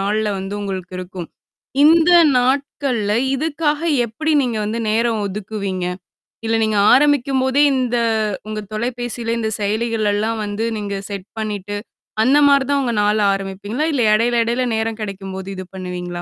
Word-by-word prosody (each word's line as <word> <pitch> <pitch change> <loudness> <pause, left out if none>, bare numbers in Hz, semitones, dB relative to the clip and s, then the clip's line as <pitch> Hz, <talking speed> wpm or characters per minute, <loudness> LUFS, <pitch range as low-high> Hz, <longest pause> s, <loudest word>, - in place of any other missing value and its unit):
நாள்ல 210 +2 0
வந்து 195 +2 -5
உங்களுக்கு 190 -2 -5
இருக்கும். 180 -2 -7 0.6
இந்த 330 +2 +6 0.3
நாட்கள்ல 255 -4 0 0.2
இதுக்காக 300 +1 -1 0.3
எப்படி 310 +8 -2
நீங்க 235 -4 -1
வந்து 220 +2 -2
நேரம் 225 0 +1
ஒதுக்குவீங்க? 195 -2 -4 0.6
இல்ல, 225 0 +1
நீங்க 215 -1 +1 0.2
ஆரம்பிக்கும்போதே 275 -1 +3
இந்த 250 -2 0 0.5
உங்க 215 0 -4
தொலைபேசில 240 0 -3
இந்த 220 -1 -1
செயலிகள் 220 +1 0
எல்லாம் 220 +2 -1
வந்து 205 +2 -3
நீங்க 200 -1 -4
செட் 200 -1 -6
பண்ணிட்டு, 205 -2 -4 0.5
அந்த 270 +5 +4
மாரி 280 -1 +5
தான் 280 -1 +2
உங்க 240 -2 -1
நாள் 210 +1 +2
ஆரம்பிப்பீங்களா? 200 +8 -3
இல்ல 255 - +1
இடையில, 235 +2 +2
இடையில 245 +2 0
நேரம் 220 0 -2
கிடைக்கும்போது 195 -1 -6
இது 185 - -6
பண்ணுவீங்களா? 180 -1 -5
220 Hz, 140 wpm, -19 LUFS, 200-250 Hz, 0.6 s, இந்த